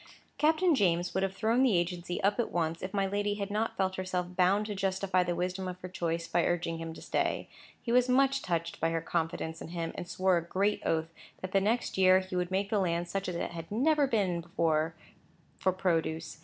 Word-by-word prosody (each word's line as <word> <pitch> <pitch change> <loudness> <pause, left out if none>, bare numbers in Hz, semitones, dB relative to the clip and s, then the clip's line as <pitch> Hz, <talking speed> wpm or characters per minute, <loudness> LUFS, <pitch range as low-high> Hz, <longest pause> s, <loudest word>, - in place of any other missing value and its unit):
Captain 320 +3 +4
James 175 - +2
would 190 - 0
have 195 0 -1
thrown 225 +4 +2
the 245 -8 +4
agency 175 0 -2
up 205 +3 +2
at 240 - 0
once, 165 -1 -1
if 185 - -4
my 195 -1 +1
lady 205 +1 -1
had 200 -1 -4
not 220 +2 -1
felt 190 0 0
herself 180 -1 -3
bound 190 +3 +3
to 210 - -4
justify 190 -1 +1
the 175 -1 -1
wisdom 185 +2 -2
of 180 0 -6
her 185 - -5
choice, 170 -2 -2
by 175 - +1
urging 165 -1 -1
him 165 0 -5
to 160 - -10
stay. - - -1 0.4
He 235 - -2
was 250 +1 +4
much 270 +1 +3
touched 170 -1 -2
by 165 - +1
her 165 0 0
confidence 165 -1 -2
in - - -6
him, 165 -1 -4
and 175 - -6
swore 185 0 +2
a 170 - -1
great 195 +4 0
oath, 160 0 -1 0.3
that 185 - -5
the 195 - +3
next 220 0 0
year 185 0 +7
he 185 0 -7
would 180 -1 0
make 195 +2 -1
the 210 - +2
land 170 -2 0
such 195 0 -2
as 180 - -4
it - - -3
had 165 +1 -8
never 285 +6 +3
been 195 -8 0
before 165 -2 0 0.6
for 185 - +2
produce. 165 -4 -1
185 Hz, 225 wpm, -30 LUFS, 170-205 Hz, 0.6 s, year